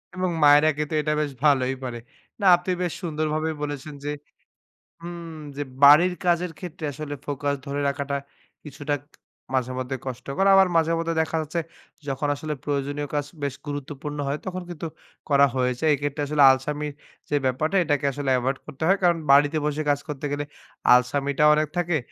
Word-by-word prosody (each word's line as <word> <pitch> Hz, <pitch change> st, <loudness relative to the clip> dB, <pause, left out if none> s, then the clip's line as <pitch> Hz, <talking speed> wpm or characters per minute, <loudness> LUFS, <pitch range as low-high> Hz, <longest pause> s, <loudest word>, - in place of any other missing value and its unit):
এবং 185 Hz, 0 st, 0 dB
মায়েরা 145 Hz, +2 st, +7 dB
কিন্তু 150 Hz, 0 st, -3 dB
তো -, -, +3 dB
এটা 150 Hz, +1 st, 0 dB
বেশ 145 Hz, -2 st, -2 dB
ভালোই 135 Hz, -3 st, +3 dB
পারে। 120 Hz, -2 st, -4 dB, 0.4 s
না -, -, 0 dB
আপনি 180 Hz, +1 st, -3 dB
বেশ 175 Hz, -2 st, -1 dB
সুন্দরভাবে 155 Hz, -1 st, -1 dB
বলেছেন 145 Hz, 0 st, -5 dB
যে 145 Hz, -, -1 dB, 0.9 s
হু 170 Hz, -, -7 dB, 0.5 s
যে 145 Hz, -, -1 dB, 0.2 s
বাড়ির 165 Hz, +6 st, +8 dB
কাজের 175 Hz, 0 st, +2 dB
ক্ষেত্রে 175 Hz, -2 st, -6 dB
আসলে 145 Hz, +1 st, -6 dB
ফোকাস 145 Hz, 0 st, -1 dB
ধরে 140 Hz, +1 st, -3 dB
রাখাটা 140 Hz, 0 st, -3 dB, 0.5 s
কিছুটা 145 Hz, 0 st, -3 dB, 0.6 s
মাঝেমধ্যে 130 Hz, +1 st, -2 dB
কষ্টকর 135 Hz, +8 st, -2 dB
আবার 190 Hz, -1 st, +7 dB
মাঝে 165 Hz, 0 st, +3 dB
মধ্যে 165 Hz, 0 st, -1 dB
দেখা 160 Hz, +1 st, -2 dB
যাচ্ছে 160 Hz, +3 st, -3 dB, 0.5 s
যখন 135 Hz, +2 st, -1 dB
আসলে 155 Hz, +1 st, -4 dB
প্রয়োজনীয় 145 Hz, 0 st, -2 dB
কাজ 145 Hz, -1 st, 0 dB, 0.2 s
বেশ 140 Hz, -2 st, -2 dB
গুরুত্বপূর্ণ 145 Hz, +1 st, -5 dB
হয় 145 Hz, +2 st, -2 dB
তখন 185 Hz, 0 st, -4 dB
কিন্তু 165 Hz, -1 st, -5 dB, 0.4 s
করা 140 Hz, 0 st, +6 dB
হয়েছে 125 Hz, +2 st, -1 dB
এক্ষেত্রে 145 Hz, +1 st, -2 dB
আসলে 150 Hz, -1 st, +3 dB
আলসামি 150 Hz, +3 st, -2 dB, 0.4 s
যে 145 Hz, -, +1 dB
ব্যাপারটা 155 Hz, +9 st, +1 dB
এটাকে 145 Hz, -2 st, 0 dB
আসলে 140 Hz, 0 st, -3 dB
এভয়েড 135 Hz, +2 st, -1 dB
করতে 155 Hz, 0 st, -7 dB
হয় 195 Hz, -, +4 dB
কারণ 175 Hz, -1 st, +4 dB
বাড়িতে 145 Hz, +2 st, +5 dB
বসে 150 Hz, +1 st, -1 dB
কাজ 145 Hz, 0 st, +2 dB
করতে 150 Hz, -1 st, -5 dB
গেলে 145 Hz, 0 st, -1 dB, 0.5 s
আলসামিটা 140 Hz, +3 st, +1 dB
অনেক 155 Hz, 0 st, +1 dB
থাকে। 175 Hz, -2 st, +1 dB
145 Hz, 165 wpm, -24 LUFS, 140-155 Hz, 0.9 s, বাড়ির